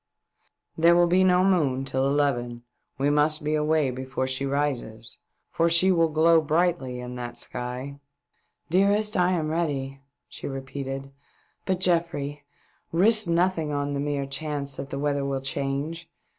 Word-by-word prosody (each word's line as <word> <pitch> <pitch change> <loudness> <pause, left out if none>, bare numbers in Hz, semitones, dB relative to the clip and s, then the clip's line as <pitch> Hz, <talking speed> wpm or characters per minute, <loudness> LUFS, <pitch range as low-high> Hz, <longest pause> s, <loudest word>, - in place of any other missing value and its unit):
" - - -44
There 170 +1 +6
will 175 0 +5
be 180 +2 +3
no 180 0 +4
moon 145 -9 +1
till 135 0 0
eleven; 120 -4 0 0.3
we 140 +2 +1
must 150 +1 +2
be 150 +1 -1
away 150 -2 +1
before 130 +1 -3
she 130 +1 -2
rises, 135 -6 -3 0.3
for 165 +1 +2
she 170 +3 +4
will 165 -2 +3
glow 160 +1 +4
brightly 155 -5 0
in 125 0 -7
that 120 -1 -6
sky." 125 +3 -2 0.3
" - - -46
Dearest, 205 +3 +2
I 180 0 +3
am, 160 -3 -1
ready," 140 -5 -2 0.3
she - - -8
repeated. 135 0 -6 0.3
" - - -39
But, 185 -2 0
GeofTrey, 165 -5 0 0.5
risk 215 +4 +4
nothing 170 -2 +1
on 145 0 -2
the 140 - -2
mere 145 -1 -2
chance 140 0 -4
that 135 - -6
the 135 - -5
weather 140 0 -1
will 140 -1 -2
change. 140 +5 -3
145 Hz, 160 wpm, -25 LUFS, 135-170 Hz, 0.5 s, There